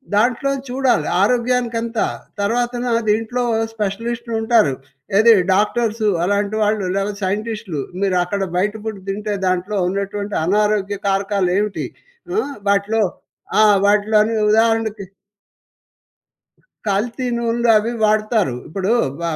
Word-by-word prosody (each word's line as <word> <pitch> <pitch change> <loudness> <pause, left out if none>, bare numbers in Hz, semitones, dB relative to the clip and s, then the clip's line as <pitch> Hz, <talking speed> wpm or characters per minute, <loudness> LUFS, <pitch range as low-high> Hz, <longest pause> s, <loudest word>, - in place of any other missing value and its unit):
దాంట్లో 240 +5 +2 0.2
చూడాలి 250 - +1
ఆరోగ్యానికంతా, 235 0 +1 0.4
తర్వాతన 240 +3 -1 0.2
దీంట్లో 225 +4 0 0.3
స్పెషలిస్టులుంటారు. 225 - 0 0.4
ఏది 230 +2 +7 0.2
డాక్టర్సు 215 +2 +1 0.2
అలాంటి 205 +3 0
వాళ్ళు. 210 -1 0
లేకపోతే 200 +1 -2
సైంటిస్ట్‌లు. 210 -5 -3 0.2
మీరక్కడ 190 0 0 0.2
బయట 205 +3 +1
పుడ్ 215 -3 -4
తింటే 210 +1 -2
దాంట్లో 185 +3 -1
ఉన్నటువంటి 200 +1 -3
అనారోగ్య 205 +1 +1
కారకాలు 195 -1 +1
ఏమిటి? 210 0 -1 0.5
ఆ! 415 - +2 0.3
వాటిలో 200 +2 +2 0.6
ఆ! - - +7 0.2
వాటిలోని 210 +2 +3
ఉదాహరణకి 220 -1 +2 1.8
కల్తీ 230 +6 -1
నూనెలు 235 0 0
అవి 220 +2 -2
వాడతారు. 215 - +1
ఇప్పుడు 190 +5 -2 0.3
బ - - -6
210 Hz, 100 wpm, -19 LUFS, 200-230 Hz, 1.8 s, ఏది